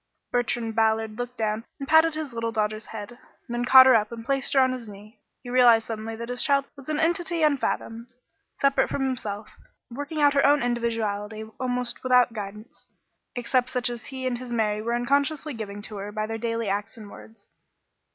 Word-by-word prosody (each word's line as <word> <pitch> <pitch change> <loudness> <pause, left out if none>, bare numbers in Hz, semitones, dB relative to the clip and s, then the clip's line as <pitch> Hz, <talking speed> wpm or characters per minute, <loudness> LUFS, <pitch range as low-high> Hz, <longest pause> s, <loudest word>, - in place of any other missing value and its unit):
Bertrand 240 -2 -1
Ballard 220 0 +1
looked 245 0 -5
down 215 0 -1
and 275 - -6
patted 320 0 +5
his 305 -5 -5
little 230 0 -2
daughter's 215 0 -2
head, 225 +2 -8 0.3
then 240 0 -2
caught 260 +1 +9
her 260 - +7
up 215 -1 +2
and 230 -1 -8
placed 275 0 0
her 275 - +5
on 260 -1 +4
his 245 -4 -6
knee. 205 +2 -13 0.2
He 245 - -8
realized 240 -3 +6
suddenly 225 0 -5
that 235 +1 -7
his 245 0 -2
child 275 -1 +2
was 275 0 -11
an 305 -1 -1
entity 340 0 +1
unfathomed, 245 -5 -1 0.4
separate 275 0 +2
from 275 - -2
himself, 215 -5 -3 0.4
working 285 +5 -5
out 290 -1 +5
her 280 - +3
own 285 -1 +4
individuality 220 -3 -2 0.2
almost 250 -1 -2
without 250 -2 +4
guidance, 210 +6 -8 0.5
except 250 +1 0
such 245 -1 -1
as 240 0 -7
he 260 -1 -6
and 245 -2 -1
his 250 -1 -8
Mary 215 -2 0
were 235 +2 -1
unconsciously 280 +4 0
giving 205 -3 -7
to 210 -1 -7
her 200 +1 -6
by 215 0 -2
their 225 +1 -5
daily 230 -1 -2
acts 205 +4 -3
and 210 -2 -11
words. 225 - -14
240 Hz, 195 wpm, -25 LUFS, 220-265 Hz, 0.5 s, caught